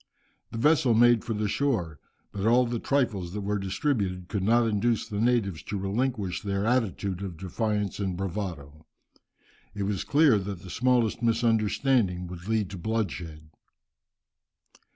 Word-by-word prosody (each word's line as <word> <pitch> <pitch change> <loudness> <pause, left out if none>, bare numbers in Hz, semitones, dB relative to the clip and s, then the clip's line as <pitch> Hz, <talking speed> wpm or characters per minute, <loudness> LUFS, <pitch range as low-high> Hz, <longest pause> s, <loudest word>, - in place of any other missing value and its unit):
The - - -7
vessel 135 -2 +3
made 120 0 +5
for 115 - -3
the 105 0 -1
shore, 100 - -1 0.3
but 100 +1 -2
all 125 +2 +5
the 120 -1 -2
trifles 110 -12 0
that 105 - -3
were 105 +1 -1
distributed 95 - -2
could 100 - -2
not 115 +4 +3
induce 110 +1 0
the 105 0 -3
natives 115 -8 +1
to 105 - -3
relinquish 100 -1 -2
their 100 -1 -2
attitude 105 -6 0
of 95 -4 -6
defiance 105 +2 -2
and 95 -3 -2
bravado. 85 -6 -5 0.9
It 100 - -2
was 100 -1 -1
clear 145 -7 +4
that 95 -1 -6
the 90 - -9
smallest 120 -2 +1
misunderstanding 115 -3 +1
would 90 +1 -9
lead 110 -4 0
to 95 - -7
bloodshed. 85 -7 -4
105 Hz, 150 wpm, -27 LUFS, 95-115 Hz, 0.9 s, made